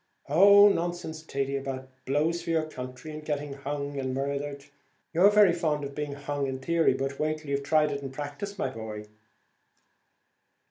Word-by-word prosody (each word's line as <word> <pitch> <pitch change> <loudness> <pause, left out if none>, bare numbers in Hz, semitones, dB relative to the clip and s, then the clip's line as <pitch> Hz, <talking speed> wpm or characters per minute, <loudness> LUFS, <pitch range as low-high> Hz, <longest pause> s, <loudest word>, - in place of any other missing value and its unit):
"Oh, 200 +6 +8
nonsense, 175 -4 -1
Thady, 140 -3 -2
about 135 -1 -4 0.2
blows 155 +5 +1
for - - -7
your 160 -1 +2
country, 130 0 -8
and 155 0 -7
getting 145 -2 -3
hung 140 0 -4
and 130 -1 -2
murthered. 140 +1 -3 0.5
You're 180 +5 +6
very 205 -4 +6
fond 155 -4 0
of 140 0 -5
being 150 0 -4
hung 145 0 -3
in 130 0 -3
theory, 165 +1 +2
but 135 +1 -3
wait 155 0 0
till 150 -2 -8
you've 140 0 0
tried 150 +1 +2
it 140 0 -3
in 135 - -5
practice, 145 +9 -6
my 135 - -1
boy." 110 -2 -7
145 Hz, 175 wpm, -28 LUFS, 140-160 Hz, 0.5 s, Oh